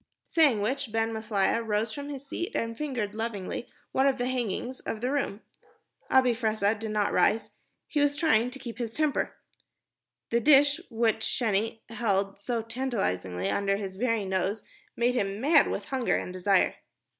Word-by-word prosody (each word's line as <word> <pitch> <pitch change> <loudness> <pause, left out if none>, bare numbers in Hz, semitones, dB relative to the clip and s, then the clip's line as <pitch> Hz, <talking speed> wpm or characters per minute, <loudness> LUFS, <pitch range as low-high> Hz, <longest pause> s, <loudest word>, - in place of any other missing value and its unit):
Saying 290 -10 +4
which, 260 +2 -2
Ben 225 0 0
Maslia 220 0 +1
rose 215 0 0
from 285 +5 -6
his 280 -1 -7
seat 345 +8 -4
and 230 0 -1
fingered 240 -8 -3
lovingly 220 0 -4 0.2
one 265 +1 +3
of 270 -1 +2
the 245 - -1
hangings 250 0 -2
of 220 - -4
the 250 +3 -1
room. 275 -7 -1 0.7
Abi 255 -2 +5
Fressah 220 -3 +1
did 220 0 -5
not 210 -1 0
rise. 220 +1 +2 0.4
He 300 - -1
was 290 0 +3
trying 250 -7 +3
to 260 - -8
keep 245 -3 -8
his 230 -2 -3
temper. 305 -2 0 1.0
The 235 - +3
dish 285 +1 +5
which 225 -1 +2
Sheni 220 -1 0
held 200 -4 0
so 230 +2 -2
tantalizingly 190 - -2
under 195 - +1
his 195 -2 -6
very 230 -2 0
nose 190 +3 -1 0.3
made 240 +1 +2
him 200 -4 -1
mad 290 +4 +5
with - - -3
hunger 260 -3 0
and 180 - -5
desire. 185 +1 +2
230 Hz, 165 wpm, -28 LUFS, 205-260 Hz, 1.0 s, Abi